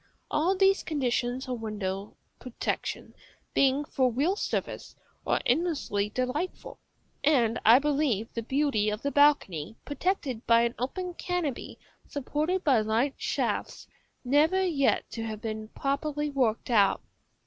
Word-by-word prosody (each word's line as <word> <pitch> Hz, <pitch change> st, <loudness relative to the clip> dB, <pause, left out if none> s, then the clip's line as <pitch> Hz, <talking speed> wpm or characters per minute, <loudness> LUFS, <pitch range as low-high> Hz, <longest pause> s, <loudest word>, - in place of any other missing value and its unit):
All 345 Hz, +6 st, +2 dB
these 390 Hz, +1 st, +4 dB
conditions 255 Hz, -3 st, -1 dB
of 250 Hz, -3 st, -4 dB
window 205 Hz, -2 st, -4 dB, 0.2 s
protection, 250 Hz, -2 st, -4 dB, 0.4 s
being 275 Hz, +2 st, +3 dB
for 260 Hz, -4 st, +1 dB
real 295 Hz, -, +1 dB
service, -, -, -4 dB, 0.3 s
are -, -, +2 dB
endlessly 255 Hz, -, 0 dB
delightful 255 Hz, -, -3 dB, 0.4 s
(and 245 Hz, -6 st, +3 dB
I 225 Hz, +3 st, +8 dB
believe 275 Hz, -6 st, 0 dB
the 230 Hz, -, -3 dB
beauty 265 Hz, -4 st, +1 dB
of 210 Hz, +1 st, -4 dB
the 280 Hz, -, 0 dB
balcony, 250 Hz, -, +3 dB
protected 285 Hz, -, -2 dB
by 230 Hz, 0 st, +5 dB
an 235 Hz, 0 st, 0 dB
open 360 Hz, +9 st, -3 dB
canopy 345 Hz, -7 st, -3 dB, 0.3 s
supported 305 Hz, +6 st, -2 dB
by 260 Hz, -7 st, +4 dB
light 225 Hz, +6 st, +1 dB
shafts, -, -, -2 dB, 0.4 s
never 310 Hz, +9 st, +3 dB
yet 290 Hz, -6 st, +1 dB
to 230 Hz, -, -5 dB
have 220 Hz, -1 st, -5 dB
been 220 Hz, -1 st, -5 dB
properly 290 Hz, +4 st, -2 dB
worked 250 Hz, -4 st, 0 dB
out). 205 Hz, -4 st, +3 dB
265 Hz, 130 wpm, -28 LUFS, 225-300 Hz, 0.4 s, I